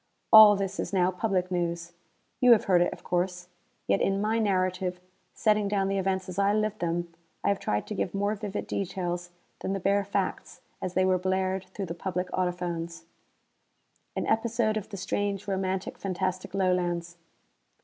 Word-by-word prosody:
All 215 -1 +11
this 195 -1 -3
is - - -2
now 185 -2 +3
public 185 -1 -1
news. 170 -1 -2 0.5
You 250 -1 +8
have 220 - +3
heard 180 -2 +4
it, 175 - +2
of - - -10
course. 180 0 -2 0.4
Yet - - +2
in 195 0 +1
my 215 +2 +1
narrative, 185 -3 0 0.4
setting 210 -1 +2
down 195 -1 +1
the 195 0 0
events 190 0 -1
as 185 +1 -5
I 200 +1 +3
lived 215 0 0
them, 170 0 -2 0.3
I - - +2
have 200 -1 +1
tried 105 0 -1
to - - -5
give 195 -2 -2
more 200 +1 +1
vivid 210 -1 -4
details 175 -2 -3 0.3
than 190 - -2
the 195 - -1
bare 200 +2 +2
facts 200 - -3 0.2
as 185 - -4
they 185 0 +3
were 185 -1 +3
blared 190 0 0
through 200 - -3
the 170 - -5
public 180 +1 -3
audiphones. 175 -2 -2 1.1
An - - -1
episode 225 -1 +1
of 215 -2 -4
the 200 - -6
strange, 200 +1 -2
romantic, 190 -1 -2
fantastic 185 0 -3
Lowlands. 175 -2 0
190 Hz, 175 wpm, -28 LUFS, 180-200 Hz, 1.1 s, All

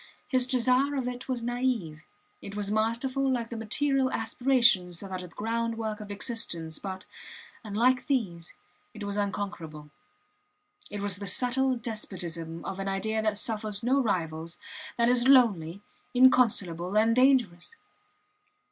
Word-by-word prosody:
His 255 -2 +2
desire 255 +2 +2
of 260 -3 -2
it 250 +1 -6
was 245 -2 -2
naive; 240 -11 -2 0.4
it 200 - -8
was 205 -1 -2
masterful 255 +5 0
like 235 -2 -2
the - - -4
material 265 +4 0
aspirations 225 -7 +2
that 195 -1 -9
are 185 - -3
the 180 - -7
groundwork 225 +2 -3
of 210 -1 -9
existence, 200 -7 -2
but, 190 -1 -6 0.6
unlike 235 +5 +1
these, 185 - -2 0.4
it 210 - -7
was 200 0 -3
unconquerable. 190 -7 -4 1.0
It 205 0 -5
was 200 -2 0
the 200 0 -5
subtle 255 +6 +2
despotism 170 -8 -5
of 195 0 -5
an 195 - -3
idea 220 +3 -1
that 215 -1 0
suffers 215 -1 -1
no 265 +4 +3
rivals, 165 -6 -2 0.4
that 235 0 +3
is 245 +1 +4
lonely, 205 -9 +4 0.3
inconsolable, 205 -8 +3
and 225 +1 +4
dangerous. 255 - +2
220 Hz, 140 wpm, -28 LUFS, 190-250 Hz, 1.0 s, is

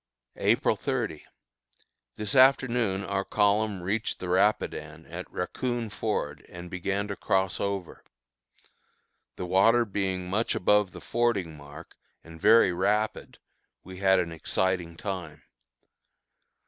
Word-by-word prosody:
April - - +2
30. - - -3 0.9
This 105 -1 -5
afternoon 125 -7 +4
our 95 - -1
column 105 -1 +1
reached 105 +5 -1
the 90 - -6
Rapidan 80 -5 0
at 85 +2 -8
Raccoon 120 +4 -3
Ford, 75 -11 -3
and 85 0 -9
began 100 +3 -2
to 100 - -3
cross 95 -1 0
over. 100 -3 -4 1.3
The 90 - -5
water 115 +7 +4
being 95 -3 -2
much 105 +5 0
above 105 0 +3
the - - -11
fording 110 -9 0
mark 75 +2 -12 0.3
and 80 -1 -13
very 115 -5 +6
rapid, 105 +4 -1 0.5
we 95 0 -10
had 95 0 +4
an 85 -2 -2
exciting 85 +1 -1
time. 90 -6 -6
95 Hz, 120 wpm, -27 LUFS, 90-105 Hz, 1.3 s, very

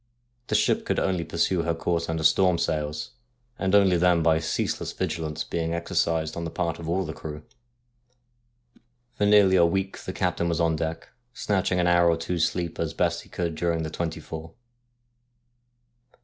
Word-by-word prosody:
The - - 0
ship - - +2
could - - -1
only 90 -3 0
pursue 85 +2 0
her 85 0 -1
course 85 0 -1
under 80 -1 -2
storm 90 +2 +4
sails, 75 -2 -2 0.5
and 95 +1 +2
only 95 -3 +5
then 85 -1 +3
by 80 -1 +4
ceaseless 80 - -2
vigilance 80 -1 -3
being 85 0 -2
exercised 85 -2 -1
on 85 - -4
the 85 - -3
part 85 -1 -2
of 80 -1 -6
all 95 +2 0
the 80 - -5
crew. 75 -1 -8 1.7
For 105 - +1
nearly 100 -2 +6
a 85 - +6
week 95 +2 -2
the - - -6
captain 85 -2 0
was 85 - -1
on 85 -1 +2
deck, 80 +1 -4 0.3
snatching 95 -2 0
an 90 - +2
hour 85 0 +4
or 85 - +2
two's 85 0 0
sleep 85 -2 -5
as - - -2
best - - 0
he - - -18
could 85 -2 -2
during 85 0 -1
the 80 - -4
twenty 85 -2 -3
four. 80 0 -8
85 Hz, 175 wpm, -26 LUFS, 80-90 Hz, 1.7 s, nearly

